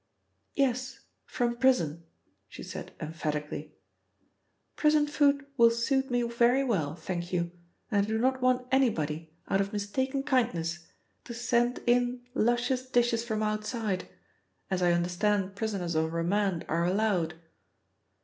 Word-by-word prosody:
"Yes: 255 -2 0 0.3
from 240 -1 -1
prison," 235 - +2 0.5
she - - -9
said - - -7
emphatically. 150 -2 -4 1.0
"Prison 300 -1 +4
food 285 -1 +2
will 235 -1 +7
suit 265 +4 0
me 245 -1 +1
very 235 +3 +3
well, 165 - 0
thank 175 +1 -5
you, 170 -1 -1 0.4
and 200 -2 +3
I 205 - -4
do 220 - +1
not 260 +3 +1
want 250 0 +2
anybody, 165 - +1 0.2
out 195 - +2
of 200 0 -2
mistaken 260 +7 -1
kindness, 175 - 0 0.4
to 235 - -7
send 240 +1 +1
in 245 0 +2
luscious 245 +1 +1
dishes 240 -2 +2
from 220 -2 -2
outside, 215 -2 -2 0.6
as 185 -1 0
I 175 -1 +4
understand 185 +3 0
prisoners 200 -6 -2
on 160 0 +1
remand 175 +2 0
are 165 +1 0
allowed." 180 -3 +1
220 Hz, 130 wpm, -29 LUFS, 175-250 Hz, 1.0 s, will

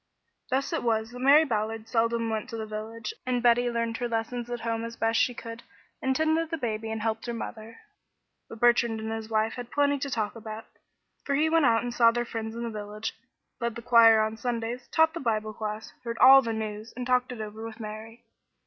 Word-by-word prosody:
Thus 270 +6 0
it 325 - 0
was 225 -1 0
that 245 - -9
Mary 285 +5 +6
Ballard 220 -2 -2
seldom 230 -1 +1
went 220 +3 -3
to 230 - -5
the 220 - -4
village, 215 +1 -6
and 250 -1 -1
Betty 245 0 +4
learned 230 -1 -2
her 245 - -2
lessons 235 +1 -3
at 240 -1 -4
home 230 0 -2
as 230 0 -6
best 225 0 +1
she 245 - +2
could, 230 +1 -8 0.4
and 265 0 +1
tended 315 +2 +1
the 330 - -2
baby 225 -4 -3
and 220 -1 -3
helped 225 +1 -2
her 235 - -3
mother. 225 0 -8 0.7
But 225 - -10
Bertrand 235 -1 +3
and 220 0 -4
his 225 0 -5
wife 220 0 +1
had 245 -1 -7
plenty 285 0 +2
to 280 - -3
talk 220 -5 -2
about; 220 0 -8 0.6
for 280 - 0
he 315 +3 +2
went 325 -3 +4
out 225 0 +3
and 245 -1 -3
saw 235 -1 +6
their 240 +1 -1
friends 225 -1 -5
in 235 - -4
the 235 - -3
village, 210 0 -5 0.5
led 235 -2 -2
the 235 - -7
choir 230 -2 +7
on 220 0 -1
Sundays, 240 +1 -3
taught 320 0 +3
the 335 - -4
Bible 215 -4 -1
class, 215 0 -5
heard 230 -1 -4
all 270 +1 +9
the 230 - -3
news, 220 0 -5
and 250 0 -4
talked 250 0 +1
it 245 - -7
over 215 +1 -6
with 225 0 -8
Mary. 220 +2 -8
230 Hz, 225 wpm, -27 LUFS, 220-245 Hz, 0.7 s, all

